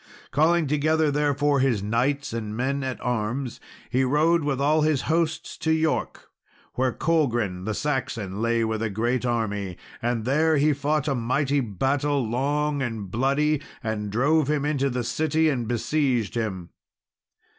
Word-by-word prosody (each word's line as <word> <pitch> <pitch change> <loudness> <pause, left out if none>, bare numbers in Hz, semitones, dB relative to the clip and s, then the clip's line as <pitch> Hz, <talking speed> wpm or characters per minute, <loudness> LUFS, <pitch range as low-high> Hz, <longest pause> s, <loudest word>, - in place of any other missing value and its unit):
Calling 160 +4 +3
together, 150 +1 +2
therefore, 145 0 +1
his 125 -7 +1
knights 125 +6 0
and 110 -2 -4
men 135 +3 -1
at 130 -1 -3
arms, 125 +2 -2 0.3
he 130 +2 +2
rode 155 +5 +3
with 140 -2 -1
all 150 +3 +3
his 150 -3 +1
hosts 160 0 -1
to 160 - 0
York, 160 0 -1 0.4
where 130 0 +1
Colgrin, 120 - 0
the 110 -1 -2
Saxon, 115 -9 -2
lay 115 0 +1
with 110 -1 -2
a 115 - 0
great 120 +5 -1
army; 105 -6 -2 0.2
and 120 -2 -1
there 155 +4 +3
he 150 +2 +3
fought 150 +1 -1
a 140 - +2
mighty 135 +4 0
battle, 135 +4 0
long 145 +4 0
and 110 -7 -4
bloody, 140 +5 +1 0.2
and 110 -2 -2
drove 145 +6 +2
him 150 -1 +1
into 140 -2 +1
the 125 -1 -2
city, 155 +6 +1
and 125 -6 -1
besieged 120 -2 0
him. 95 -7 -3
135 Hz, 155 wpm, -25 LUFS, 115-150 Hz, 0.4 s, Calling